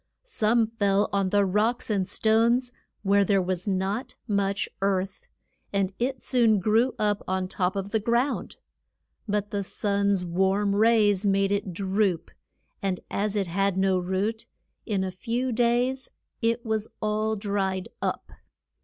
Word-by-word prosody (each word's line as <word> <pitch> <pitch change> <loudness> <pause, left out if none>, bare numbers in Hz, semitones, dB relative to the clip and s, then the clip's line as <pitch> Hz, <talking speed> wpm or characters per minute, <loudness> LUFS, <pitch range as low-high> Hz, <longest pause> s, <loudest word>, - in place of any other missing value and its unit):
Some 230 - +2
fell 205 -2 +1
on 195 -1 +1
the 205 +1 +3
rocks 215 +5 0
and 195 -3 0
stones 235 +3 +2 0.3
where 200 0 +4
there 195 0 +2
was 185 +1 -2
not 195 +5 -2
much 200 -1 0
earth, 195 -1 0 0.5
and 195 -1 0
it 255 +1 -2
soon 235 -4 +3
grew 220 +6 +2
up 210 -1 0
on 185 0 -1
top 185 0 -1
of 195 0 -3
the 220 - +2
ground. 235 +5 0 0.7
But 205 0 -1
the 200 -1 -1
sun's 200 -1 0
warm 190 +3 +1
rays 210 -2 +4
made 195 0 +2
it 200 -2 -1
droop, 190 -1 0 0.5
and 190 -2 -1
as 210 +1 -1
it 200 -2 +1
had 195 +2 0
no 190 -1 +2
root, 190 +5 -2 0.4
in 200 -4 0
a 190 - -3
few 235 +7 -2
days 245 +3 +1 0.3
it 230 +1 0
was 220 -1 -1
all 215 +1 0
dried 195 -2 -2
up. - - -3
200 Hz, 145 wpm, -26 LUFS, 195-220 Hz, 0.7 s, where